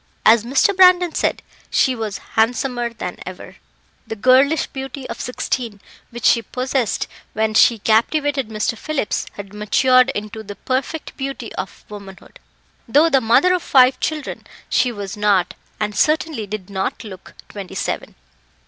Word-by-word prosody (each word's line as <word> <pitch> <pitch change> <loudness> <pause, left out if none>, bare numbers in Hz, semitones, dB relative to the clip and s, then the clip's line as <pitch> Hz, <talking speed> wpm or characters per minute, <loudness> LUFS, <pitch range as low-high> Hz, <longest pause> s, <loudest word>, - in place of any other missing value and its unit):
As 220 0 +6
Mr. 270 +11 +2
Brandon 360 -2 +5
said, - - -1 0.3
she 260 - +2
was 220 -4 -4 0.2
handsomer 240 +1 0
than 180 -6 -6
ever; 185 0 -10 0.5
the 225 - -4
girlish 260 +7 +4
beauty 270 0 -7
of 230 - -6
sixteen, 245 -3 -3 0.3
which 240 0 -7
she 235 - +5
possessed 255 -1 -2 0.3
when 220 0 0
she 230 +1 +5
captivated 270 +5 +1
Mr. 215 +1 -1
Phillips, 285 -1 -2
had 200 -1 -9
matured 255 +5 +3
into 215 +1 -5
the 205 -1 -9
perfect 270 +7 -3
beauty 275 0 -5
of - - -7
womanhood. 200 -2 -12 0.5
Though 295 +8 +4
the 270 - +4
mother 240 +11 +4
of 365 - 0
five 260 -3 +4
children, 310 -2 -4 0.2
she 250 0 +2
was 200 -3 -6
not, 205 -4 +2 0.3
and 210 -1 -2
certainly 305 -3 +1
did 205 -1 -6
not 190 -1 -3
look, 190 -4 -11
twenty 200 -3 -9
seven. - - -3
235 Hz, 150 wpm, -20 LUFS, 210-270 Hz, 0.5 s, As